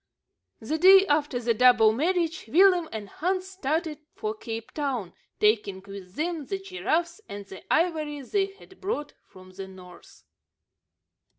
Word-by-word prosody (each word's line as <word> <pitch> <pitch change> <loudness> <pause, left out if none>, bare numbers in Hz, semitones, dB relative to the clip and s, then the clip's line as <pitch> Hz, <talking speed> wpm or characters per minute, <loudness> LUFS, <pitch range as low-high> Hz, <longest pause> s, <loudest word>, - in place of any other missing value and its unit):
The 300 +8 -3
day 380 +2 +8
after 295 -5 +1
the 235 -1 +1
double 230 -2 +5
marriage, 335 +5 0
Willem 355 - +4
and 215 -2 -6
Hans 370 - -2
started 315 -3 -2 0.2
for 430 0 -3
Cape 225 - -7
Town, 260 - -3 0.3
taking 210 -3 +2
with 195 -2 -10
them 320 -2 -3
the 390 - -2
giraffes 365 -1 -2
and 200 0 -7
the 190 -1 -11
ivory 310 -3 +1
they 390 +9 0
had 390 -1 -17
brought 370 -7 -3
from 185 -1 -15
the 190 +1 -8
north. 180 -2 -15
295 Hz, 140 wpm, -26 LUFS, 220-360 Hz, 0.3 s, day